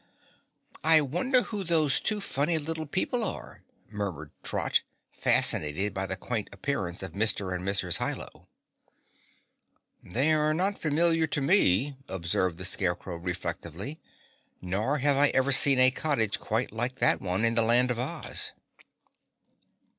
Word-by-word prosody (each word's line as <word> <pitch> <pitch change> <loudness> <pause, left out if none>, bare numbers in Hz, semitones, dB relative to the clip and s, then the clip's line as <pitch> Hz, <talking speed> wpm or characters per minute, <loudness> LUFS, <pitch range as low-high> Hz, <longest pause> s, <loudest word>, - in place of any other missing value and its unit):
"I 160 0 +6
wonder 180 - +1
who 210 -3 -5
those 160 -5 +3
two 210 -1 -2
funny 160 -2 0
little 160 0 -4
people 225 - 0
are?" - - -5 0.3
murmured 95 -8 -5
Trot, - - 0 0.3
fascinated 95 +7 +1
by 95 0 -2
the 95 - -1
quaint 110 +1 -3
appearance 100 -5 -4
of 95 - -4
Mr. 100 -1 0
and 90 0 -4
Mrs. 95 -3 +1
Hi - - 0
Lo. - - -11 1.5
"They 135 - 0
are 155 0 +1
not 195 +4 0
familiar 165 +1 +2
to 150 -1 -1
me," 135 - +2
observed 90 -1 -2
the 90 - -6
Scarecrow 90 -2 -2
reflectively, 90 - -5 0.6
"nor 105 +11 -1
have 145 0 +2
I 145 +1 +5
ever 135 +1 +2
seen 135 +1 +6
a 130 0 +6
cottage 130 -7 0
quite 115 +4 -1
like 120 +3 -2
that - - +2
one 95 +3 -1
in 115 - +2
the 115 - +3
Land 120 +2 +3
of 120 - -3
Oz." 150 +5 -1
125 Hz, 145 wpm, -27 LUFS, 95-155 Hz, 1.5 s, I